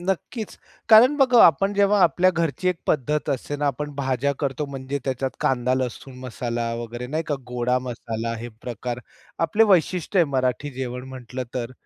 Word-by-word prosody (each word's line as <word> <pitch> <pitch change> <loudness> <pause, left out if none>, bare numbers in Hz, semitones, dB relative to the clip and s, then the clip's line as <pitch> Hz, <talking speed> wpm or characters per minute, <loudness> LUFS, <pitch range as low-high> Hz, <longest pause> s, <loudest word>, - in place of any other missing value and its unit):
नक्कीच. 195 +4 -3 0.3
कारण 240 +6 +7
बघा, 255 -4 +6
आपण 195 +6 +2
जेव्हा 200 0 +3
आपल्या 175 +3 +4
घरची 170 +1 -1
एक 180 - 0
पद्धत 150 +1 0
असते 140 +2 -3
ना. 145 0 -1
आपण 145 +2 -2
भाज्या 135 0 0
करतो, 140 0 -2
म्हणजे 135 0 -4
त्याच्यात 135 0 -1
कांदा-लसूण 130 +1 -1
मसाला 120 -2 -3
वगैरे 120 +1 -6
नाही 155 +5 -2
का? 150 - 0
गोडा 125 +1 0
मसाला 115 -2 -4
हे 120 +2 -6
प्रकार 120 0 -4 0.5
आपले 205 +7 +3
वैशिष्ट्य 185 -1 +2
आहे 175 - +6
मराठी 130 +2 0
जेवण 125 -1 -5
म्हटलं 130 -1 -6
तर. 125 -1 -3
135 Hz, 160 wpm, -23 LUFS, 125-170 Hz, 0.5 s, कारण